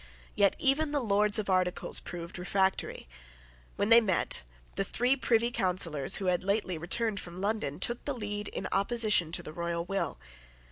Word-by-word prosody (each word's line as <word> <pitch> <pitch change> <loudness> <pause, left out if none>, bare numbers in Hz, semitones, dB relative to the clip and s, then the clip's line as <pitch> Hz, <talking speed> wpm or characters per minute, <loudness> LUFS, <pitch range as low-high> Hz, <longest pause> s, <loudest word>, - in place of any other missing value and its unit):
Yet 200 -1 +3
even 290 +3 +2
the 295 - +1
Lords 210 -2 +2
of 215 - -2
Articles 185 -2 +1
proved 175 +1 -8
refractory. 190 - -1 0.7
When 205 - -1
they 230 0 +8
met, 190 - 0 0.3
the 195 - 0
three 245 +7 +1
Privy 235 -2 +1
Councillors 175 - +1
who 195 - 0
had 180 -1 +1
lately 200 -2 0
returned 200 +5 -1
from 175 +1 -8
London 200 -8 -2
took 240 +7 +1
the 285 - -2
lead 205 -2 -4
in - - -4
opposition 210 -4 +2
to 175 - -1
the 155 - -9
royal 170 0 -3
will. 195 +1 -2
200 Hz, 170 wpm, -29 LUFS, 180-225 Hz, 0.7 s, they